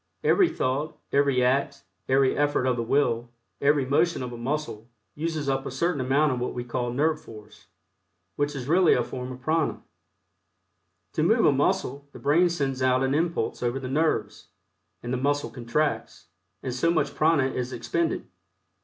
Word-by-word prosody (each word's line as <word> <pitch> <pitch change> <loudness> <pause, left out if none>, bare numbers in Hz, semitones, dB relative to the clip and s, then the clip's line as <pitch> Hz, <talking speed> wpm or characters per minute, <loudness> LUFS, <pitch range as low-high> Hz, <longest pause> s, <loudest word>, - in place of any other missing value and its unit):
Every 375 -3 +4
thought, 140 +4 -2
every 140 -3 +3
act, 130 -7 0 0.3
every 135 0 +3
effort 145 -3 +1
of 130 -1 +2
the 120 - -2
will, 120 -1 +1 0.3
every 145 -1 +3
motion 155 +2 +1
of 125 -1 -6
a - - -6
muscle, 120 -3 -4 0.2
uses 155 0 -3
up 135 0 0
a - - -5
certain 145 +3 -1
amount 140 +4 +2
of 125 - -2
what 125 - -3
we 120 - -3
call 120 0 -3
nerve 155 +5 +1
force, 105 -2 -14 0.7
which 145 0 -1
is 130 -2 -5
really 175 +2 +5
a 120 - +1
form 125 +1 -6
of 130 0 -9
prana. 155 +3 0 1.3
To - - 0
move - - +3
a - - +6
muscle 140 +2 0
the - - -9
brain 165 +5 +3
sends 135 -6 -2
out 130 0 +3
an 135 0 +1
impulse 165 +3 -1
over 125 +2 -1
the 130 -1 -6
nerves, 130 - -1 0.6
and 120 +1 -3
the - - 0
muscle 145 -1 0
contracts, 125 +5 -2 0.3
and 130 - -3
so 130 +7 +1
much 145 -4 +1
prana 155 -4 +3
is 125 0 -3
expended. 130 - -2
135 Hz, 175 wpm, -26 LUFS, 125-150 Hz, 1.3 s, a